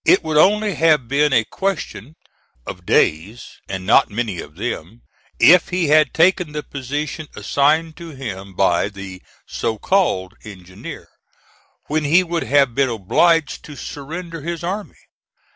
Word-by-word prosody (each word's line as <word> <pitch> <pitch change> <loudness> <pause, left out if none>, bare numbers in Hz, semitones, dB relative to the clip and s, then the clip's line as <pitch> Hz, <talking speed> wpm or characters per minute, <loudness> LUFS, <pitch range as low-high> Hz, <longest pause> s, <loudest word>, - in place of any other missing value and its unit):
It 185 - +4
would 155 -1 -1
only 210 +5 +4
have 155 -6 +2
been 145 +3 +2
a 120 -4 +4
question 160 - -4 0.5
of - - -9
days, 95 +10 0
and 95 -1 -5
not 110 - +4
many 105 -4 -3
of 75 - -13
them, 110 +1 -6 0.4
if 170 +9 +6
he 180 -4 0
had 155 0 +4
taken 175 -1 +2
the 150 0 -4
position 145 +3 -5
assigned 150 +9 +1
to 170 -1 -9
him 100 - -8
by 95 0 +2
the 100 -2 -10 0.2
so 115 -2 -3
called 105 - 0
engineer, 95 -3 -10 0.8
when 155 +1 -1
he 165 +6 +4
would 170 -1 -2
have 140 -3 +3
been 135 +1 +1
obliged 135 - +1
to 150 - -10
surrender 165 +6 -7
his 170 +2 -5
army. 195 +4 -5
145 Hz, 145 wpm, -20 LUFS, 110-165 Hz, 0.8 s, if